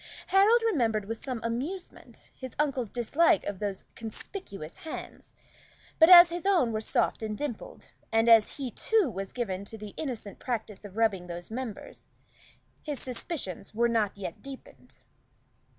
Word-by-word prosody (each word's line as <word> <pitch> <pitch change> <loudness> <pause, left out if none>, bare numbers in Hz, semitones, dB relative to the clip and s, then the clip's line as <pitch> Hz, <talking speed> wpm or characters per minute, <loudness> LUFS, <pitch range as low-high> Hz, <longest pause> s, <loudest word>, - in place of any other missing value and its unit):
Harold 420 +5 +5
remembered 230 - +1
with 225 +2 -5
some 255 -4 -3
amusement 275 +11 -5
his 260 -2 -9
uncle's 270 -6 0
dislike 295 - +2
of 205 -2 -4
those 200 -2 -3
conspicuous 220 - -8
hands; 320 - -8 0.6
but 320 +1 +8
as 345 -1 +11
his 345 0 -4
own 360 -12 +3
were 215 -1 -2
soft 220 - 0
and 215 -1 -3
dimpled, 285 -7 -6 0.2
and 225 +1 +3
as 225 +2 +6
he 265 -4 -4
too 415 - +1
was 195 -1 -5
given 200 -6 -3
to 220 +2 -7
the 210 -1 -9
innocent 240 -9 -5
practice 220 -5 -4
of 205 0 -11
rubbing 195 -6 +1
those 175 +3 -7
members, 235 -3 -6 0.7
his 295 -3 -4
suspicions 245 - -5
were 235 +2 +3
not 220 -4 0
yet 190 -4 -6
deepened. 275 -1 -12
235 Hz, 150 wpm, -29 LUFS, 210-295 Hz, 0.7 s, as